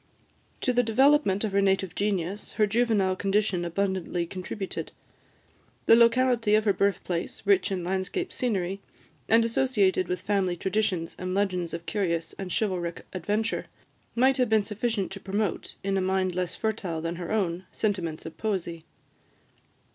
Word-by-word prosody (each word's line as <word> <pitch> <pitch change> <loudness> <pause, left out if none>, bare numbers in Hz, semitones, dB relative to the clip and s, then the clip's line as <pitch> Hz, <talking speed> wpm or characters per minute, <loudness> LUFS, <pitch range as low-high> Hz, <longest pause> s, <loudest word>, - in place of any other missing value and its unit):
To 250 - +1
the 245 - +4
development 245 -3 +3
of 215 - -1
her 200 +1 +3
native 190 -2 +1
genius, 200 -1 -2
her 215 - +3
juvenile 210 -3 +2
condition 195 -2 +1
abundantly 180 -1 -1
contributed: 185 +2 -5 0.9
the - - +8
locality 235 -2 +4
of 215 0 +2
her 200 - +4
birthplace, 185 -4 -1
rich 195 -1 +3
in 185 -2 -2
landscape 190 - -2
scenery, 195 -6 -1 0.5
and 230 +1 +5
associated 215 -7 +2
with 180 - -2
family 195 -4 0
traditions 190 -3 -1
and 185 0 -3
legends 185 -4 0
of 170 0 -6
curious 170 -5 -1
and 190 -2 -5
chivalric 180 -5 -2
adventure, 210 +5 -1 0.5
might 260 +3 +4
have 250 -3 +2
been 220 -1 +4
sufficient 210 -1 -2
to 195 - -6
promote, 200 0 -2
in 195 0 0
a - - +1
mind 185 0 +1
less 180 -1 -2
fertile 205 -7 -2
than 165 +1 -3
her 175 +1 -5
own, 185 -4 0
sentiments 180 -7 -2
of 160 - -7
poesy. 175 -6 -3
195 Hz, 150 wpm, -27 LUFS, 180-220 Hz, 0.9 s, the